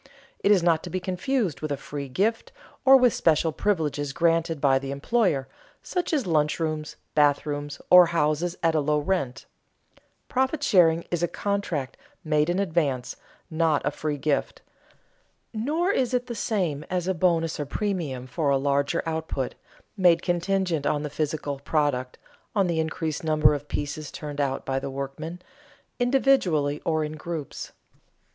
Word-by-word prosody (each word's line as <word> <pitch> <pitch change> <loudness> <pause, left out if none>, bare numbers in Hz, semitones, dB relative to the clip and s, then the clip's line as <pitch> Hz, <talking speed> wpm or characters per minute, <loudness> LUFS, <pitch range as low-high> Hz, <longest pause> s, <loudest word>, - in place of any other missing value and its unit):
It - - +1
is 190 -4 +5
not 165 -2 +3
to - - -7
be 185 - -2
confused 185 - -1
with 155 -1 -3
a 140 - -1
free 140 -1 -6
gift, 225 - 0 0.3
or 270 0 +9
with 250 -3 +4
special 160 0 +2
privileges 150 -7 -1
granted 165 -1 +1
by 135 -2 +3
the 135 0 -6
employer, 140 - 0 0.4
such 360 -2 -2
as 290 -6 +1
lunch 155 -3 +1
rooms, 155 -1 -3 0.2
bathrooms 145 0 +1
or 180 -1 +9
houses 165 +1 0
at 165 -1 +3
a 155 - +2
low 150 +1 +1
rent. 145 -5 -2 0.8
Profit 265 +3 0
sharing 170 - +4
is 175 -2 0
a 175 - +2
contract 200 -11 -3 0.3
made 150 -1 +1
in 175 - +1
advance, 160 -10 0 0.4
not 160 -2 +1
a 145 - +1
free 150 0 -3
gift. 145 +1 -1 0.9
Nor 305 - 0
is 255 -8 +1
it 245 0 0
the 240 - -5
same 180 -10 -1
as 180 -1 -1
a 190 - +2
bonus 165 -2 +1
or 145 - -3
premium 160 -10 -2
for 140 +3 -1
a 140 - +4
larger 140 +4 0
output, 160 -5 -3 0.4
made 175 -4 +4
contingent 175 -3 0
on 150 0 0
the 150 - -4
physical 150 -2 -2
product, 140 -4 -1 0.4
on 200 -2 +3
the 170 -2 0
increased 160 -1 -2
number 155 -1 +4
of 145 0 -5
pieces 145 0 -4
turned 145 -1 -5
out 135 -1 -2
by 135 0 -1
the 135 - -5
workmen, 140 +5 -6 0.6
individually 245 - +2
or 160 -1 +1
in 150 - -4
groups. 155 -2 -6
160 Hz, 160 wpm, -25 LUFS, 145-185 Hz, 0.9 s, or